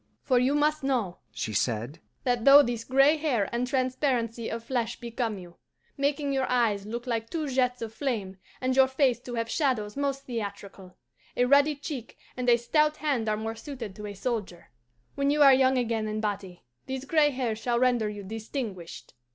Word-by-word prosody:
"For 255 -3 +3
you 260 +3 +2
must 300 +1 +2
know," 245 -10 -1
she 110 0 -4
said, 120 +7 -1 0.2
"that 245 -2 0
though 280 +2 +9
this 235 -2 -3
gray 275 +5 +4
hair 265 -10 0
and 240 +1 0
transparency 255 -3 -1
of 230 0 -5
flesh 235 -2 -2
become 235 -2 -3
you, 175 -2 -12 0.4
making 280 0 0
your 265 -1 0
eyes 220 -5 +1
look 235 +2 -5
like 230 -2 -2
two 315 -3 -3
jets 250 -2 0
of 225 -1 -6
flame 220 -9 -3 0.2
and 255 0 0
your 265 0 +6
face 265 -2 +2
to 245 -1 -7
have 230 0 -1
shadows 230 -6 -1
most 275 -1 -2
theatrical, 200 -5 -7 0.4
a 245 - +4
ruddy 285 +3 +4
cheek 280 -4 -7 0.2
and 250 -1 -1
a 235 - +6
stout 300 +5 +1
hand 265 -8 0
are 215 - 0
more 220 +1 -3
suited 230 -5 -8
to 210 0 -7
a 205 - -7
soldier. 200 -6 -4 0.4
When 280 0 0
you 295 +1 +4
are 275 -1 +8
young 260 0 +4
again 230 -3 -1
in 215 0 -3
body, 200 -4 -4 0.2
these 265 0 -4
gray 300 0 +4
hairs 250 -5 -2
shall 240 0 0
render 240 -3 +2
you 205 -1 -7
distinguished." 215 - -6
245 Hz, 190 wpm, -27 LUFS, 215-270 Hz, 0.4 s, though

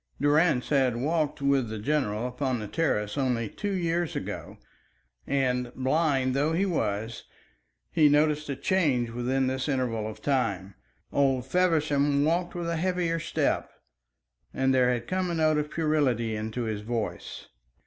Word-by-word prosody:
Durrance 145 -2 +3
had 130 -4 +2
walked 150 +1 -1
with 135 -4 +2
the 110 - -4
general 115 -2 -1
upon 125 0 -2
his 105 -2 -7
terrace 135 -8 0
only 125 -4 0
two 205 - -4
years 170 -2 -1
ago, - - -5 0.7
and 125 -3 0
blind 135 -1 +1
though 145 +4 +1
he 185 +4 +2
was, 110 - -2 0.7
he 155 -3 +5
noticed 150 0 +2
a 140 - -1
change 140 -6 +1
within 125 +3 0
this 130 +2 -2
interval 120 -5 -1
of 110 - -9
time. 100 -9 -1 0.4
Old 135 -3 +2
Feversham 145 -3 +2
walked 175 +3 0
with 175 -1 -3
a 170 -1 -1
heavier 175 -1 0
step, - - -1 0.9
and 130 0 +2
there 125 -1 +4
had 120 -1 -2
come 185 -1 -1
a 170 - -1
note 155 -1 +3
of 150 0 -3
puerility 140 -9 0
into 110 +3 -3
his 110 -2 -3
voice. 115 0 -4
135 Hz, 150 wpm, -27 LUFS, 120-155 Hz, 0.9 s, he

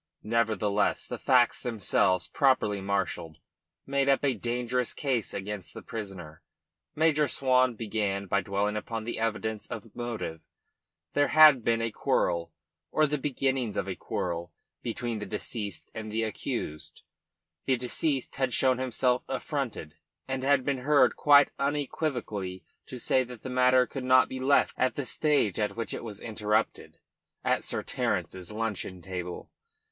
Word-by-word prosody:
Nevertheless 105 -2 +1
the - - -5
facts 125 -2 +3
themselves, 95 -5 +1
properly 130 -8 +2
marshalled, 95 -5 -2 0.5
made 140 0 +1
up 135 +1 +3
a 135 - +3
dangerous 120 +2 -1
case 130 -7 -1
against 100 -1 -6
the - - -8
prisoner. 95 -8 -7 0.5
Major 155 -1 +3
Swan 130 -3 +3
began 105 -3 -2
by 100 +1 +1
dwelling 100 +2 -1
upon 110 +1 -4
the 120 +1 -4
evidence 110 -1 -2
of 115 -1 -8
motive: 115 -9 -4 0.7
there 145 0 +3
had 150 -5 +7
been 115 0 +1
a 115 - -1
quarrel, 85 -4 0 0.4
or 155 - +3
the 150 0 -1
beginnings 130 -4 -1
of - - -1
a - - -3
quarrel, 85 -1 -3 0.3
between 120 -1 -3
the 105 - -5
deceased 100 -2 -5
and 110 -1 -6
the 110 +1 0
accused; 75 -7 -5 0.6
the 130 - +3
deceased 130 +3 -1
had 130 -2 0
shown 130 -1 +3
himself 125 0 +1
affronted, 130 - -4 0.3
and 130 0 -2
had 135 -1 +3
been 140 -2 0
heard 145 +3 +4
quite 145 -1 +6
unequivocally 130 - -2 0.2
to 130 - -7
say 130 +2 +2
that 125 -2 -11
the 130 - -5
matter 125 0 +4
could 135 0 -6
not 130 0 +5
be 130 - -6
left 135 +2 +3
at 130 - +2
the 145 - -3
stage 140 - +1
at 105 -1 -1
which 115 0 -3
it - - -5
was 105 -3 -7
interrupted 110 -1 -1 0.5
at - - +1
Sir - - -2
Terence's 90 0 -2
luncheon 105 -5 -3
table. 90 -2 -6
115 Hz, 150 wpm, -28 LUFS, 105-130 Hz, 0.7 s, had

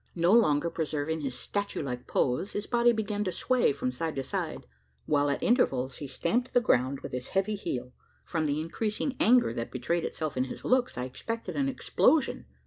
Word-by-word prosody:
No 170 +1 +3
longer 170 -8 +4
preserving 155 0 -2
his 135 -3 -3
statue 200 -5 -3
like 125 -3 -5
pose, 130 +10 0
his 205 - -2
body 240 0 +4
began 210 -2 -1
to 185 - -1
sway 255 - +2
from 125 -2 -2
side 160 +5 -3
to 135 - -2
side; - - -4 0.4
while 145 -1 +2
at 140 - -1
intervals, 135 - +2
he 145 - -6
stamped 240 - -1
the - - +8
ground 130 - +1
with - - -7
his 125 0 -4
heavy 195 +2 0
heel. 125 -11 -4 0.3
From 160 -3 -1
the 145 +1 0
increasing 215 - -2
anger 240 - +5
that 115 0 -4
betrayed 160 +7 -1
itself 155 -2 -3
in 130 0 +1
his 130 - -8
looks, 250 - +2
I 125 - -2
expected 230 - -5
an 275 -1 +1
explosion. 275 +2 +2
165 Hz, 195 wpm, -29 LUFS, 135-225 Hz, 0.4 s, the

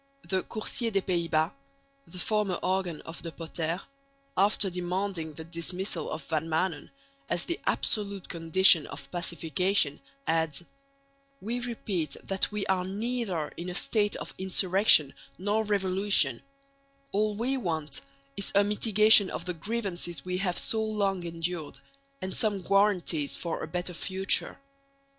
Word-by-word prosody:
The 190 -1 +1
Coursier 230 +3 -2
des 195 -3 0
Pays 170 -2 0
Bos 160 0 +2 0.6
(the 185 - -9
former 210 -1 0
organ 185 -4 -1
of 165 - -9
De 165 - -6
Potter), 165 +1 -3 0.6
after 200 +1 +4
demanding 180 -2 -3
the 160 - -8
dismissal 175 +4 -4
of - - -5
Van 160 0 -2
Maanen 160 0 -1 0.4
as 175 - 0
the 340 - -2
absolute 200 -3 +1
condition 165 0 +5
of 140 -1 -9
pacification, 170 -1 0 0.3
adds: 160 -1 0 0.8
We 235 +5 -3
repeat 205 - -3
that 195 +2 0
we 210 -1 -2
are 185 -1 +1
neither 200 -4 -2
in 175 +2 -5
a 180 - -4
state 205 +1 +1
of - - -6
insurrection 190 -5 +4 0.2
nor 205 +4 0
revolution; 195 - +2 0.7
all 210 +1 +1
we 245 +5 0
want 160 - -3 0.3
is 200 - -3
a 200 - +6
mitigation 210 -1 +5
of 170 - -5
the 180 - -2
grievances 175 -5 -3
we 180 0 -2
have 180 -2 0
so 220 -1 +3
long 200 -4 0
endured, 165 -2 -4 0.5
and 185 - -4
some 205 -4 0
guarantees 180 -7 +2
for 170 -2 -4
a - - -4
better 180 0 -3
future. 190 +3 +1
185 Hz, 140 wpm, -29 LUFS, 165-205 Hz, 0.8 s, a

